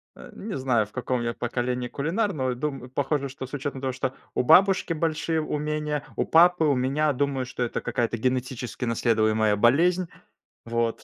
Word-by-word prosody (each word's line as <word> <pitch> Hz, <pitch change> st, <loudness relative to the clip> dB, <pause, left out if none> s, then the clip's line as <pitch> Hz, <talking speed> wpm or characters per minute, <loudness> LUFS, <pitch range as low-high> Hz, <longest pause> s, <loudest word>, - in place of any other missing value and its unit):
Э, -, -, -12 dB
не 205 Hz, -4 st, -5 dB
знаю, 125 Hz, -5 st, +1 dB
в 105 Hz, -, -20 dB
каком 125 Hz, 0 st, -2 dB
я 115 Hz, 0 st, -2 dB
поколении 125 Hz, +1 st, -2 dB
кулинар, 185 Hz, -, -1 dB
но 130 Hz, -3 st, -1 dB
дум 130 Hz, 0 st, -4 dB
похоже, 140 Hz, +1 st, -1 dB
что 130 Hz, 0 st, -7 dB
с 135 Hz, -, -19 dB
учетом 140 Hz, -1 st, -4 dB
того, 130 Hz, -1 st, -2 dB
что 130 Hz, 0 st, -2 dB, 0.2 s
у -, -, +1 dB
бабушки 185 Hz, +5 st, +5 dB
большие 160 Hz, 0 st, -1 dB
умения, 150 Hz, -1 st, -2 dB
у -, -, +1 dB
папы. 175 Hz, 0 st, +5 dB
У 145 Hz, -2 st, +3 dB
меня, 140 Hz, +4 st, +1 dB
думаю, 135 Hz, -1 st, -1 dB
что 125 Hz, 0 st, -4 dB
это 120 Hz, -, -2 dB
какая-то 120 Hz, -2 st, -1 dB
генетически 125 Hz, +1 st, -2 dB
наследуемая 110 Hz, -2 st, +2 dB
болезнь, 170 Hz, -, +3 dB, 0.6 s
вот. 115 Hz, 0 st, -1 dB
130 Hz, 175 wpm, -25 LUFS, 120-150 Hz, 0.6 s, бабушки